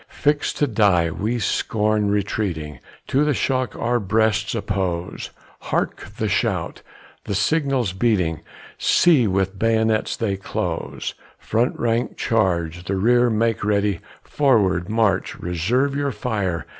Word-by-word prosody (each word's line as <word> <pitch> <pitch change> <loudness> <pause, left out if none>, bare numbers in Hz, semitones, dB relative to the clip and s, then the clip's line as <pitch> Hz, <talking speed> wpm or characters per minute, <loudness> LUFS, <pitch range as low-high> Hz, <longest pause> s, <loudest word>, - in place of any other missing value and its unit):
Fix'd 145 0 0
to 145 - +3
die, 100 - +2
we 110 +8 -2
scorn 105 -2 0
retreating, 95 - -2 0.3
To 140 +3 +2
the 150 -2 +1
shock 130 -4 -1
our 120 +1 0
breasts 110 +1 +1
oppose, 95 -5 -3 0.3
Hark! - - -2
the - - -1
shout, - - -1 0.4
the 100 - -2
signal 135 +3 +1
beating, 90 -9 +1 0.4
See, 150 -10 +4
with 95 0 -1
bayonets 110 -1 +1
they 100 -4 -1
close: 95 - -4 0.2
Front 115 +3 0
rank 115 0 0
charge! 90 -6 0
the 95 - -1
rear 120 +5 +3
make 115 -1 0
ready! 100 -3 +1 0.2
Forward, 100 -11 +2
march 110 -4 +1
reserve 115 - 0
your 140 -1 0
fire! 105 -6 -2
110 Hz, 125 wpm, -22 LUFS, 95-120 Hz, 0.4 s, See